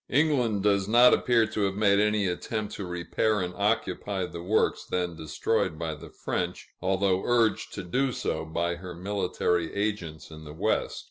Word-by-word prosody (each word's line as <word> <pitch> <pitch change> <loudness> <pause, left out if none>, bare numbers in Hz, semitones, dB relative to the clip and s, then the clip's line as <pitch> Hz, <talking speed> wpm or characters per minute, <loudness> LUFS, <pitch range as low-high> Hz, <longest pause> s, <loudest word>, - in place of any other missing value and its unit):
England 125 -8 +2
does 100 -2 +2
not 120 +3 +7
appear 120 -2 +3
to 110 0 -3
have 100 -1 +1
made 100 -1 +3
any 105 -1 +2
attempt 105 +4 -3
to 100 - -5
repair 90 +5 0
and 90 -1 -3
occupy 100 -1 -1
the 85 -1 -7
works 105 +5 +1
then 90 -2 -2
destroyed 80 +2 -1
by 80 -1 -3
the 75 - -10
French, 90 0 -4
although 95 0 +1
urged 115 -3 +2
to 100 - -6
do 130 +9 0
so - - -2
by 85 +2 -1
her 90 0 -8
military 90 -2 -1
agents 100 -8 -3
in 80 0 -10
the 75 -1 -9
West. - - 0
95 Hz, 175 wpm, -27 LUFS, 85-110 Hz, -, not